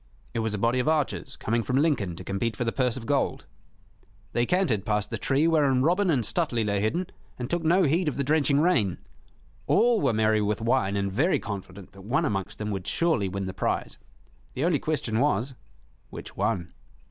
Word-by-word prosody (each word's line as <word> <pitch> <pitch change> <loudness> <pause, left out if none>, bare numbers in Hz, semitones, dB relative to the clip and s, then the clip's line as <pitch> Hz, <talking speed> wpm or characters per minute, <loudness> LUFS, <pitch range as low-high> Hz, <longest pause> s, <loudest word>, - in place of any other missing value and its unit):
It - - -1
was 110 -1 -1
a - - -3
body 115 +5 +1
of 125 - -1
archers 155 -3 -1
coming 115 +2 0
from 130 +3 -1
Lincoln 135 - +1
to 90 - -9
compete 100 +4 -2
for - - -1
the 115 - 0
purse 125 -1 0
of 120 - -7
gold. 140 +1 0 0.9
They 120 0 +1
cantered 170 - +1
past 105 -1 -1
the - - -3
tree 140 +4 +2
wherein 140 -6 +3
Robin 180 +5 +2
and 135 -8 +2
Stuteley 120 - 0
lay 100 -1 0
hidden, 165 - 0 0.3
and 125 - -4
took 170 -1 0
no 175 +4 +4
heed 165 +3 +2
of 150 - -1
the 140 - 0
drenching 145 0 +2
rain. 130 - +2 0.7
All 230 +1 +3
were 135 - +3
merry 110 -1 +2
with 105 0 0
wine 115 -3 +1
and 100 -1 -1
very 145 - +2
confident 100 -2 -7
that 95 - -14
one 120 +8 0
amongst 95 -2 -2
them 105 0 -3
would 95 -2 -4
surely 160 - +1
win 95 +1 -3
the 95 - -5
prize. - - -2 0.6
The 135 - 0
only 170 -5 +2
question 125 -8 -1
was, 130 -1 +1 0.6
Which - - -9
one? 90 -1 -1
120 Hz, 205 wpm, -26 LUFS, 105-150 Hz, 0.9 s, no